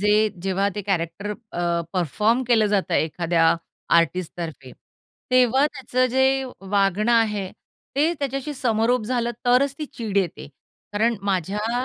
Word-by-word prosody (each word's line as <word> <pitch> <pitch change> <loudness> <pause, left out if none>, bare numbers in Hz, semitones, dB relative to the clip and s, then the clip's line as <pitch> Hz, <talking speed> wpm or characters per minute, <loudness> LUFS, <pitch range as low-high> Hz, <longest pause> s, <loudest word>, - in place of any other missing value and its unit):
जे 210 +1 +3
जेव्हा 195 +1 +1
ते 205 - -4
कॅरेक्टर 190 +1 -2 0.2
अ, 170 -1 0
परफॉर्म 210 - +1
केलं 225 -3 +4
जातं 205 -2 0
एखाद्या 165 +1 +2 0.4
आर्टिस्टतर्फे, 165 -5 -3 0.6
तेव्हा 255 +2 +4
त्याचं 255 -3 -1
जे 265 +1 +2 0.2
वागणं 200 +3 +1
आहे, 210 -4 +1 0.5
ते 305 +4 +3
त्याच्याशी 275 +1 -3
समरोप 240 -1 +1
झालं 240 0 -1 0.2
तरच 255 +3 +3
ती 310 - -3
चीड 220 -6 -5
येते. 180 -6 -1 0.4
कारण 225 +3 +1
माझ्या 205 +6 -1
210 Hz, 125 wpm, -23 LUFS, 185-250 Hz, 0.6 s, केलं